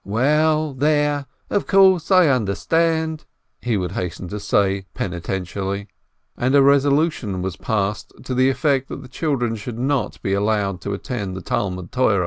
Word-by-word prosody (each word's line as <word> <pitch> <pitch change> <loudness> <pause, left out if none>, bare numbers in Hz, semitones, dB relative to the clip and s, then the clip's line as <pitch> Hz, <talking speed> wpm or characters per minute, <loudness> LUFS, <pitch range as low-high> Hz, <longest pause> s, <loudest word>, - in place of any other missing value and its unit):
"Well, 150 +7 +2
there! 145 0 +1 0.2
Of 205 - 0
course, 190 -4 +5
I 185 -3 +6
understand 160 +7 0 0.2
!" 110 -1 -50
he 120 -3 0
would 90 -2 -2
hasten 90 0 -4
to 105 - -5
say, 100 -2 +1
penitently. 95 +2 -4 0.5
And 130 +3 +1
a 140 - +6
resolution 140 - +2
was 95 -2 -3
passed, 105 -1 -2
to 130 - -4
the 130 +1 +3
effect 135 -1 0
that - - -7
the - - -11
children 125 -5 -1
should 115 +2 -7
not 135 +2 -1
be 95 - 0
allowed 100 -2 0
to 100 - -3
attend 100 -5 -5
the - - -6
Talmud 90 -3 -3
Torah. 115 -6 +2
125 Hz, 160 wpm, -21 LUFS, 100-145 Hz, 0.5 s, I